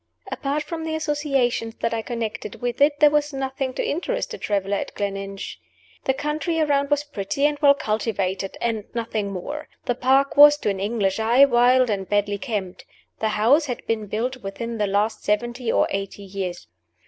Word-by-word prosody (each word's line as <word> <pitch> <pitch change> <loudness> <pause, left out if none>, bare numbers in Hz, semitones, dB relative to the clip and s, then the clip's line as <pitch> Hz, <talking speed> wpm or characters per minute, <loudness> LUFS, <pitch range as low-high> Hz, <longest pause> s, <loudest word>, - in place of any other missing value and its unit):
Apart 290 +1 -2
from 320 +1 -5
the 320 0 -2
associations 275 -7 0
that 230 - -2
I 225 - -1
connected 225 -3 -4
with 245 +2 -3
it, 290 0 +4
there 300 -1 +7
was 295 0 +1
nothing 270 -1 -3
to - - -1
interest - - -2
a - - -7
traveler 200 -1 0
at - - -5
Gleninch. 195 -1 -4 0.5
The 265 - +2
country 305 +3 -1
around 285 -2 +2
was 290 0 +2
pretty 280 0 -2
and 295 -1 +1
well 280 -1 +6
cultivated, 200 -5 -2
and 225 -3 -1
nothing 220 -3 -2
more. 290 +12 -5 0.2
The 245 - +1
park 270 +3 +2
was, 295 0 +9
to 210 - 0
an 195 - -4
English 200 -1 0
eye, 235 +5 +6
wild 250 -1 +4
and 195 -2 -3
badly 205 0 +1
kept. 205 -8 -4 0.4
The 220 - +1
house 280 +9 +4
had 245 - -5
been 220 -2 -2
built 240 +6 -2
within 230 +1 -5
the 210 - +1
last 205 +3 0
seventy 235 +3 -1
or - - +3
eighty 195 +1 -4
years. 190 -2 -5
240 Hz, 185 wpm, -23 LUFS, 205-285 Hz, 0.5 s, was